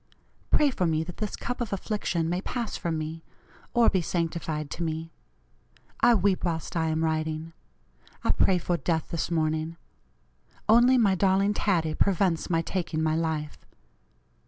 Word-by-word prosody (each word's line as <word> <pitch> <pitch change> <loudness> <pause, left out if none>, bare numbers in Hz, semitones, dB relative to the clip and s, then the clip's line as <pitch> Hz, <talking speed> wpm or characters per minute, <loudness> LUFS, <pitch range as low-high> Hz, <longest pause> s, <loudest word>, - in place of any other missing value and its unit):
Pray 295 -2 +4
for 180 -8 0
me 160 -1 +1
that 175 +1 -9
this 215 -2 -3
cup 245 0 -4
of 230 - -3
affliction 195 -4 -1
may 175 +2 -1
pass 235 +2 -3
from 165 -2 -2
me, 160 +1 -5 0.5
or 240 -2 +4
be 190 - +3
sanctified 165 -3 -2
to - - -5
me. 160 0 -3 0.9
I 240 - +6
weep 200 -3 +1
whilst 165 -1 -2
I 165 -1 +1
am 160 0 0
writing. 160 0 -2 0.7
I - - +3
pray 190 - +3
for 175 0 -1
death 165 -2 -1
this 165 -1 -2
morning. 160 0 -1 0.9
Only 240 +4 +6
my 210 -5 +4
darling 195 +2 +2
Taddie 170 -7 +1
prevents 180 -2 +1
my 165 -1 +1
taking 165 -3 -2
my 155 0 +2
life. 160 -2 -2
170 Hz, 160 wpm, -27 LUFS, 160-195 Hz, 0.9 s, I